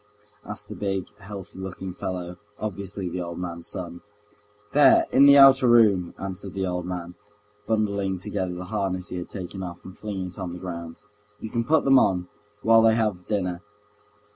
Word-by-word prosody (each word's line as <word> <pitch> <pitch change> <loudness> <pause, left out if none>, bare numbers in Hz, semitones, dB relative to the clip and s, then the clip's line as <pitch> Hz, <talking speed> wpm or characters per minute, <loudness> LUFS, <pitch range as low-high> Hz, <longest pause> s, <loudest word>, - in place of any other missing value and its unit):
asked - - -6
the - - -7
big, 95 -3 -2
healthy 95 -1 -9
looking 95 0 -6
fellow, 90 -1 -5 0.2
obviously 100 -2 -4
the 90 +1 -4
old 85 -1 -6
man's 85 -2 -5
son. 85 -2 -6 0.7
"There... 145 0 +6
in 140 +2 +7
the 140 0 +8
outer 135 -2 +8
room," 105 -7 +4
answered 95 0 -6
the 95 -1 -1
old 90 -1 -3
man, 90 -1 -5 0.5
bundling 100 -3 0
together 95 -1 -3
the 90 +1 -6
harness 95 -1 -2
he 90 - -5
had 90 - -6
taken 95 -1 -7
off, 90 -2 -8
and 95 - -10
flinging 95 -3 -5
it 90 - -11
on 90 -2 -4
the 90 - -7
ground. 85 -2 -6 0.4
"You 110 - -7
can 115 - 0
put 155 +5 +3
them 135 -1 +6
on, 90 -5 +1 0.3
while 115 0 +6
they 110 0 +5
have 105 -6 -1
dinner." 90 -4 -1
95 Hz, 180 wpm, -25 LUFS, 90-105 Hz, 0.7 s, the